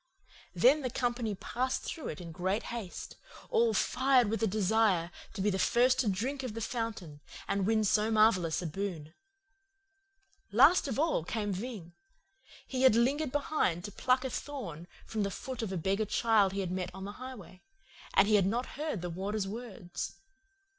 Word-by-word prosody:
"Then 255 - +5
the 255 - -2
company 240 -3 -1
passed 255 +6 -2
through 315 - -5
in 165 +2 -6
great 185 +6 -1
haste, 215 -7 -6 0.3
all 460 -1 +4
fired 255 -4 +3
with 225 - -1
a 225 - +3
desire 195 -3 +2 0.2
to - - -4
be 210 - +2
the 190 - -1
first 245 +6 +3
to 235 - +2
drink 250 +9 -2
of 250 -5 -5
the - - -3
fountain 210 -10 -4 0.3
and 200 -1 0
win 220 -1 +3
so 210 +1 +2
marvellous 200 -7 +3
a - - -4
boon. 165 -2 -4 1.4
Last 280 - +6
of 265 - -3
all 310 - +1
came 205 +2 -2
Ving. 190 -4 -6 0.7
He 260 -1 -3
had 260 -4 +6
lingered 270 +5 +2
behind 280 - 0
to 205 - -6
pluck 255 +5 +1
a 260 - -2
thorn 180 - -6 0.2
from 220 - -3
the 200 - 0
foot 250 +5 -6
of 220 -4 -3
a 190 - -2
beggar 195 +5 0
child 210 -3 +3
he 200 - -1
had 180 -2 -3
met 185 -1 -2
on 190 0 -6
the 200 - -5
highway, 220 -8 -9 0.5
and 195 - +6
he 215 - +2
had 195 -3 +5
not 240 +7 -2
heard 300 - -2
the 175 - -3
Warder's 195 +3 -2
words. 200 -5 -6
215 Hz, 180 wpm, -31 LUFS, 190-250 Hz, 1.4 s, Last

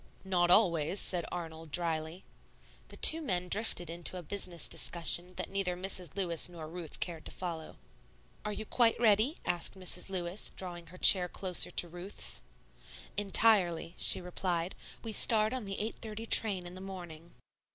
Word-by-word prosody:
"Not 175 -2 +1
always," 175 -2 +3
said 175 -2 +1
Arnold, 165 -2 -7
dryly. 165 +1 -3 0.6
The - - -10
two 325 +1 +6
men 180 - -3
drifted 200 -3 0
into 170 +2 -5
a 180 - -8
business 175 -3 +2
discussion 175 +1 +2
that - - -6
neither 195 -2 -2
Mrs. 180 -3 -4
Lewis 175 -3 +1
nor 165 -3 -9
Ruth 170 0 -9
cared 165 -3 -5
to - - -6
follow. 170 -3 -7 0.7
"Are 210 - -4
you 215 +1 -5
quite 230 0 +2
ready?" 225 - +2
asked 175 +2 -1
Mrs. 180 0 -3
Lewis, 180 +1 -2
drawing 175 -2 -6
her 180 +3 -14
chair 180 -1 +7
closer 185 -1 +2
to 175 - 0
Ruth's. 175 +4 -5 0.7
"Entirely," 195 -5 +2
she - - +1
replied; 180 -1 -3 0.3
"we 225 - -5
start 215 +1 +3
on 255 -4 -5
the 195 0 -5
8.30 220 +1 -6
train 195 -6 +5
in 175 - -9
the 185 - -11
morning." 175 -4 -10
180 Hz, 160 wpm, -31 LUFS, 170-200 Hz, 0.7 s, chair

